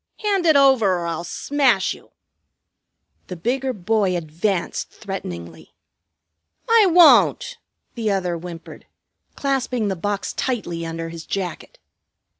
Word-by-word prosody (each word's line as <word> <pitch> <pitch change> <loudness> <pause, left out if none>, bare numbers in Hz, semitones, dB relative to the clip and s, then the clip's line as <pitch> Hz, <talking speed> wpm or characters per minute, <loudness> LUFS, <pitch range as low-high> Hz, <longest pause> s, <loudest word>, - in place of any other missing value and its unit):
Hand 395 -4 +1
it 315 - +5
over, 265 -8 +5
or 170 - -4
I'll 170 0 -3
smash 255 +1 +1
you!" - - -17 1.2
The 180 - -6
bigger 255 +9 -1
boy 200 -3 0
advanced 170 +3 -2
threateningly. 85 - -8 0.9
"I 455 -3 +5
won't!" 360 +8 +5 0.3
the 225 -3 -2
other 185 -3 -1
whimpered, 170 0 -10 0.5
clasping 260 -5 -1
the 190 - -1
box 200 +3 -3
tightly 190 -10 -3
under 165 0 -5
his 165 -1 -9
jacket. 185 -4 -5
200 Hz, 115 wpm, -21 LUFS, 170-265 Hz, 1.2 s, it